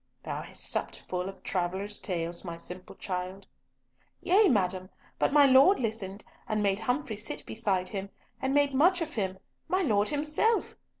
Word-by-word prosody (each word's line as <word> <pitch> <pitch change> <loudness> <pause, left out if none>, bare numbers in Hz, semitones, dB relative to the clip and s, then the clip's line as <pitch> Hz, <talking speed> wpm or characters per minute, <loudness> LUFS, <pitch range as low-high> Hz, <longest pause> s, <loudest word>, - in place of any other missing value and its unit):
"Thou - - -4
hast - - -1
supped - - -2
full 180 +1 -2
of 195 - -12
travellers' 190 +3 -2
tales, 170 -2 -3
my 170 -3 -6
simple 180 +2 -8
child." 185 +1 -5 0.7
"Yea, 400 +4 +4
madam, 185 - +1 0.3
but - - +2
my 290 0 +7
Lord 275 +9 +6
listened, 215 -4 -3 0.2
and 215 -1 0
made 200 0 +1
Humfrey 245 +1 -1
sit 210 +1 -3
beside 195 -5 -1
him, 195 -1 -5 0.3
and 265 0 0
made 285 0 +3
much 350 +7 +4
of 320 -2 -3
him—my 200 - -3
Lord 210 - +2
himself! 305 +10 +1
210 Hz, 160 wpm, -29 LUFS, 185-285 Hz, 0.7 s, my